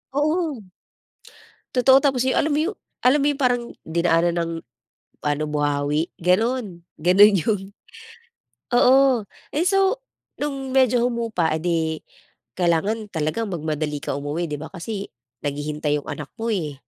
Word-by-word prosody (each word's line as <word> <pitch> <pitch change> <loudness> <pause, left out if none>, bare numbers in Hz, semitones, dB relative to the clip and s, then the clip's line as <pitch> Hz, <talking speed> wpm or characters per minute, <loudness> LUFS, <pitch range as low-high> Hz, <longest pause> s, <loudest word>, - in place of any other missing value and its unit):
Oo. 305 - 0 1.1
Totoo, 260 +1 +6
tapos 270 -3 +2
yung, 260 - +1
alam 310 - +2
mo 295 - +2
yung 415 - -7 0.3
alam 255 +4 +4
mo 285 - +2
yung 285 -1 -3
parang 245 -2 +2 0.2
dinaanan 170 +1 +2
ng 165 -1 -1 0.7
ano, 145 0 0
buhawi, 145 +1 0
gano'n, 190 0 0 0.2
gano'n 195 +5 +6
yung 210 0 0 1.1
Oo. 260 -1 +5 0.3
Ay, 300 - +2
so 390 +6 +2 0.4
no'ng 270 -2 -3
medyo 255 -2 +4
humupa, 230 -8 -1
eh 155 - -3
di 175 -1 +1 0.8
kailangan 195 +6 +1
talaga 160 +8 -1
magmadali 155 -4 -3
ka 140 - -2
umuwi, 150 +4 -3
'di 150 - -3
ba 160 - -6
kasi 195 +2 -5 0.4
naghihintay 150 +1 -1
'yong - - -15
anak 145 -1 -6
mo 230 - -1
eh. 160 -8 -2
195 Hz, 140 wpm, -23 LUFS, 155-255 Hz, 1.1 s, Totoo